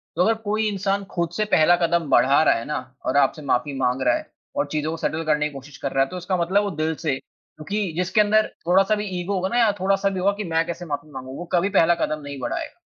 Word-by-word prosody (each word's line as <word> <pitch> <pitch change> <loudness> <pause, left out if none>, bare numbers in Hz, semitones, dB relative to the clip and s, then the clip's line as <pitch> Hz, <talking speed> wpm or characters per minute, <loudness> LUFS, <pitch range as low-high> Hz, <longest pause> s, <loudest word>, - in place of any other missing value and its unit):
तो 175 - +1
अगर 225 - +4
कोई 215 +1 0
इंसान 200 0 -1
खुद 170 -2 -1
से 215 - +1
पहला 160 +3 +6
कदम 170 -2 0
बढ़ा 140 +4 +5
रहा - - +5
है 115 - -4
ना 150 - -2 0.3
और - - +1
आपसे 140 +2 +2
माफ़ी 140 +2 0
माँग 130 0 0
रहा - - +3
है - - -6 0.3
और - - +1
चीज़ों 155 +1 -1
को 165 - -4
सेटल 160 0 -2
करने 150 -1 +2
की 150 - -10
कोशिश 135 0 -10
कर 140 - -4
रहा 135 0 +3
है 135 - -4
तो 185 - -6
उसका 180 +1 -1
मतलब 190 +4 +2
वो 205 - -1
दिल 155 +1 0
से 150 -4 -1
क्योंकि 190 +4 -6
जिसके 180 +4 +2
अंदर 215 +1 +3 0.2
थोड़ा-सा 195 +4 +4
भी 210 0 -3
ईगो 180 +3 -3
होगा 190 +1 -1
ना 240 - -1
या 225 -3 +5
थोड़ा-सा 195 +1 +2
भी 190 - -3
होगा 195 +2 +3
कि 210 - -3
मैं 165 -2 0
कैसे 175 +1 -6
माफ़ी 145 0 -5
माँगू, 130 -1 -8
वो 175 - -6
कभी 180 +3 +3
पहला 175 -4 +4
कदम 155 -2 -2
नहीं 140 -1 -7
बढ़ाएगा। 125 - -4
170 Hz, 265 wpm, -23 LUFS, 150-195 Hz, 0.3 s, पहला